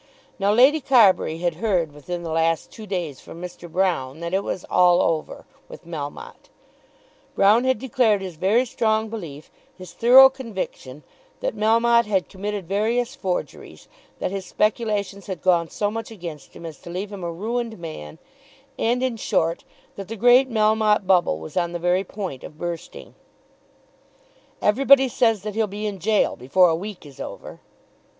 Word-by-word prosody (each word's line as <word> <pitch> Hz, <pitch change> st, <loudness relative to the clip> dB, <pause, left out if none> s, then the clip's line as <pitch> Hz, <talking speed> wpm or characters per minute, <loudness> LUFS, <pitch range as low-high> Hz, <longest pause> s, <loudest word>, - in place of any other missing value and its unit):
Now 200 Hz, +1 st, +2 dB
Lady 265 Hz, +8 st, +5 dB
Carbury 215 Hz, -11 st, +4 dB
had 170 Hz, -1 st, -2 dB
heard 180 Hz, -8 st, +1 dB
within 170 Hz, +4 st, -6 dB
the 165 Hz, -, -5 dB
last 165 Hz, 0 st, 0 dB
two 220 Hz, -2 st, -11 dB
days 175 Hz, -8 st, -4 dB
from 165 Hz, -, -12 dB
Mr. 175 Hz, -1 st, -9 dB
Broune 165 Hz, -7 st, -1 dB
that 170 Hz, +1 st, -5 dB
"it 195 Hz, +1 st, +1 dB
was 185 Hz, -, -4 dB
all 180 Hz, -1 st, +4 dB
over" 160 Hz, -2 st, -1 dB, 0.2 s
with -, -, -12 dB
Melmotte. 150 Hz, -4 st, -8 dB, 0.9 s
Broune 215 Hz, +5 st, +4 dB
had 260 Hz, -2 st, +2 dB
declared 230 Hz, -3 st, +1 dB
his 185 Hz, -3 st, -7 dB
very 205 Hz, +10 st, +2 dB
strong 220 Hz, -2 st, 0 dB
belief, 165 Hz, -10 st, -8 dB, 0.3 s
his 185 Hz, -1 st, -11 dB
thorough 255 Hz, +3 st, +8 dB
conviction, 200 Hz, -, -7 dB, 0.4 s
that -, -, -2 dB
Melmotte 230 Hz, +1 st, +3 dB
had 195 Hz, -3 st, 0 dB
committed 200 Hz, -1 st, -5 dB
various 230 Hz, +6 st, 0 dB
forgeries, 190 Hz, -11 st, -5 dB, 0.3 s
that -, -, -3 dB
his 195 Hz, -1 st, -4 dB
speculations 210 Hz, -2 st, -1 dB
had 190 Hz, -2 st, -6 dB
gone 170 Hz, -3 st, +2 dB
so 205 Hz, -1 st, -2 dB
much 225 Hz, 0 st, -5 dB
against 170 Hz, -9 st, -9 dB
him 170 Hz, -, -10 dB
as 160 Hz, -3 st, -8 dB
to -, -, -12 dB
leave 190 Hz, +4 st, -5 dB
him 195 Hz, -3 st, -7 dB
a 170 Hz, -, -3 dB
ruined 225 Hz, +5 st, -3 dB
man, 155 Hz, -, -8 dB, 0.6 s
and, 245 Hz, +3 st, +1 dB
in 255 Hz, -3 st, -1 dB
short, 165 Hz, -5 st, -1 dB, 0.3 s
that 195 Hz, -2 st, -7 dB
the 225 Hz, -, -6 dB
great 245 Hz, +4 st, +5 dB
Melmotte 215 Hz, -2 st, +2 dB
bubble 180 Hz, -, +3 dB
was 80 Hz, -, -10 dB
on 175 Hz, -1 st, 0 dB
the -, -, -2 dB
very 180 Hz, +2 st, +1 dB
point 190 Hz, -11 st, -7 dB
of 150 Hz, -, -11 dB
bursting. 170 Hz, 0 st, -7 dB, 1.5 s
"Everybody 270 Hz, +5 st, +5 dB
says 225 Hz, -4 st, +1 dB
that 210 Hz, -1 st, -4 dB
he'll 220 Hz, 0 st, 0 dB
be 205 Hz, +2 st, -6 dB
in 200 Hz, -2 st, -4 dB
gaol 215 Hz, +3 st, +1 dB
before 170 Hz, +9 st, +3 dB
a 165 Hz, -, +1 dB
week 195 Hz, 0 st, -7 dB
is 140 Hz, -2 st, -14 dB
over." -, -, -8 dB
195 Hz, 170 wpm, -23 LUFS, 170-225 Hz, 1.5 s, thorough